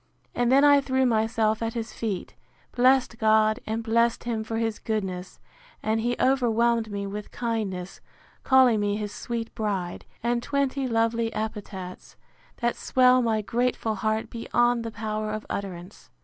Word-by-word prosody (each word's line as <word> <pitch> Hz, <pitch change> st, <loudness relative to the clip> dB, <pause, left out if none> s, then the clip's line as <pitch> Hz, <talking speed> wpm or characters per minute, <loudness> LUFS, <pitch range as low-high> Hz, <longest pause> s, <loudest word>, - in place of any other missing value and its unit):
And 245 Hz, 0 st, +1 dB
then 275 Hz, +2 st, +6 dB
I 285 Hz, -1 st, +6 dB
threw 265 Hz, -1 st, +1 dB
myself 220 Hz, -1 st, +1 dB
at 230 Hz, 0 st, -2 dB
his 230 Hz, 0 st, -4 dB
feet, 210 Hz, -5 st, -4 dB, 0.4 s
blessed 250 Hz, -1 st, +3 dB
God, 215 Hz, +1 st, +3 dB
and 220 Hz, +1 st, -2 dB
blessed 230 Hz, +1 st, +2 dB
him 230 Hz, -2 st, -2 dB
for 225 Hz, +1 st, -4 dB
his 225 Hz, -1 st, -1 dB
goodness; 190 Hz, -4 st, -4 dB, 0.4 s
and 220 Hz, +1 st, +1 dB
he 240 Hz, +2 st, 0 dB
overwhelmed 235 Hz, -3 st, +2 dB
me 200 Hz, 0 st, -3 dB
with 205 Hz, +1 st, -6 dB
kindness, 210 Hz, -6 st, -3 dB, 0.4 s
calling 260 Hz, -4 st, +5 dB
me 205 Hz, 0 st, 0 dB
his 210 Hz, -1 st, -4 dB
sweet 230 Hz, -1 st, -5 dB
bride, 195 Hz, -5 st, -3 dB, 0.2 s
and 240 Hz, 0 st, +1 dB
twenty 275 Hz, 0 st, -1 dB
lovely 230 Hz, 0 st, +1 dB
epithets, 205 Hz, -4 st, -6 dB, 0.5 s
that 240 Hz, 0 st, +1 dB
swell 255 Hz, 0 st, +4 dB
my 220 Hz, -3 st, 0 dB
grateful 235 Hz, 0 st, 0 dB
heart 215 Hz, +2 st, -2 dB
beyond 240 Hz, +1 st, +1 dB
the 230 Hz, -, -4 dB
power 215 Hz, -1 st, -3 dB
of 215 Hz, 0 st, -4 dB
utterance. 185 Hz, -1 st, -6 dB
225 Hz, 150 wpm, -26 LUFS, 215-240 Hz, 0.5 s, then